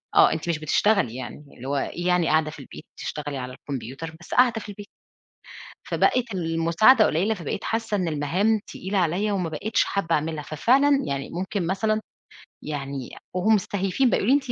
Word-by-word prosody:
آه، - - +7
أنتِ 160 +2 -4
مش 155 -2 0
بتشتغلي 155 - +2
يعني، 140 +3 -7
اللي 130 +2 -8
هو 140 - -1
إيه 175 +6 -3
يعني 180 -2 +3
قاعدة 155 -1 +2
في - - -11
البيت - - -11
بتشتغلي 145 -2 -5
على 125 0 -5
الكمبيوتر، 135 +4 -7
بس - - -8
قاعدة 240 -3 +4
في 205 - -10
البيت، 205 +1 -9 1.0
فبقِت 240 -4 +1
المساعدة 170 +8 +4
قليلة، 190 +8 +1
فبقيت 175 -1 -5
حاسّة 225 -2 -1
إن 180 -3 -1
المَهام 180 +9 +1
تقيلة 195 +2 -4
عليّا 185 +4 +1
وما 180 -4 -1
بقيتش 200 +8 0
حابّة 170 -4 0
أعملها، 155 0 -2
ففعلًا 275 - +3
يعني 140 0 -3
ممكن 185 0 -3
مثلًا 215 +3 0 0.6
يعني 140 -3 -5 0.2
وهم 215 +4 +3
مستهيفين 200 +5 +1
بقى - - +2
يقولوا 260 +7 +4
لي: 285 - 0
180 Hz, 175 wpm, -24 LUFS, 150-215 Hz, 1.0 s, آه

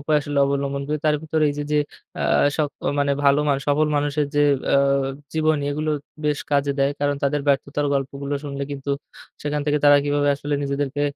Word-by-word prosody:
উপায় 150 +2 +1
আসলে 145 0 -2
অবলম্বন 140 0 -1
করি। 150 0 -1
তার 150 -1 +4
ভেতরে 160 0 0
এইযে 145 +1 -4
যে, 150 - +3 0.4
আ - - -2 0.3
সক 150 -2 0 0.3
মানে 140 0 +2
ভালো 140 0 +5
মানুষ 140 -1 +1
সফল 150 +2 +3
মানুষের 145 0 0
যে 145 - +3 0.3
আ - - +6 0.6
জীবনী 155 -2 +1
এগুলো 155 +2 -1 0.3
বেশ 150 -1 +1
কাজে 140 0 +2
দেয়। 140 +1 +3
কারণ 145 0 +1
তাদের 140 +1 +1
ব্যর্থতার 140 +1 +1
গল্পগুলো 140 +1 -3
শুনলে 140 -1 -4
কিন্তু, 140 0 -5 0.5
সেখান 150 0 -1
থেকে 150 0 +2
তারা 145 0 +8
কিভাবে 145 0 +1
আসলে 145 +1 -3
নিজেদেরকে 140 0 -2
145 Hz, 185 wpm, -22 LUFS, 140-150 Hz, 0.6 s, তারা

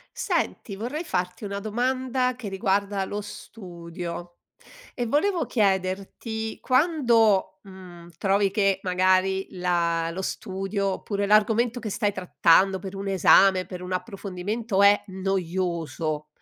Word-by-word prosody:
Senti, 200 - -2
vorrei 255 - -4
farti 180 - -3
una 200 0 -4
domanda 250 +4 -1
che 240 -4 -6
riguarda 195 0 0
lo 205 +2 -4
studio. 175 -4 -8 0.6
E 245 - -2
volevo 310 - +1
chiederti, 200 +2 -1
quando, 245 - +2
mhmm, 180 -3 -13
trovi 195 0 +2
che 195 -2 +2
magari 185 +1 +2
la 170 -2 0
lo 175 +3 -5
studio 195 +1 -3
oppure 200 +1 -2
l'argomento 225 +3 +3
che 220 - -5
stai 210 0 0
trattando 190 0 +3
per 190 +1 -8
un 195 0 -5
esame, 190 0 +5
per 180 -1 -8
un 180 0 -6
approfondimento, 200 +2 -2
è 200 +1 +6
noioso, 170 -5 -2
195 Hz, 120 wpm, -25 LUFS, 185-220 Hz, 0.6 s, è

